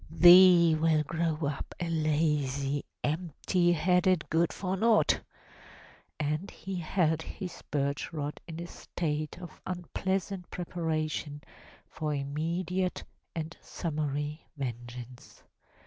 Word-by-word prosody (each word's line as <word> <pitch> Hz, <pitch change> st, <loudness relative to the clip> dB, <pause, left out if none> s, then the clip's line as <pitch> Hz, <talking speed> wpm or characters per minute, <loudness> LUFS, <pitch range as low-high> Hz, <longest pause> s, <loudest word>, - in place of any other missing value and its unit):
Thee 175 Hz, 0 st, +8 dB
will 155 Hz, -1 st, +3 dB
grow 165 Hz, +1 st, -1 dB
up 140 Hz, -1 st, -4 dB
a 175 Hz, -, -2 dB
lazy, 150 Hz, -3 st, 0 dB, 0.2 s
empty 175 Hz, +3 st, +1 dB
headed 180 Hz, +1 st, +3 dB
good 165 Hz, +1 st, +3 dB
for 190 Hz, -1 st, -2 dB
naught!" 220 Hz, +2 st, +3 dB, 1.0 s
And 155 Hz, +5 st, -1 dB
he 190 Hz, -1 st, -6 dB
held 160 Hz, -2 st, +1 dB
his 180 Hz, +1 st, -7 dB
birch 140 Hz, -1 st, -1 dB
rod 150 Hz, -2 st, -4 dB
in 165 Hz, -1 st, -6 dB
a 170 Hz, -, -4 dB
state 155 Hz, -3 st, -3 dB
of 175 Hz, -2 st, -10 dB
unpleasant 190 Hz, +1 st, -2 dB
preparation 155 Hz, -4 st, -3 dB, 0.4 s
for 155 Hz, -1 st, -3 dB
imme 155 Hz, +6 st, -2 dB
diate 180 Hz, +1 st, -1 dB, 0.3 s
and 165 Hz, 0 st, -4 dB
summary 150 Hz, -1 st, -3 dB
vengeance. 120 Hz, -1 st, -7 dB
160 Hz, 110 wpm, -30 LUFS, 150-175 Hz, 1.0 s, Thee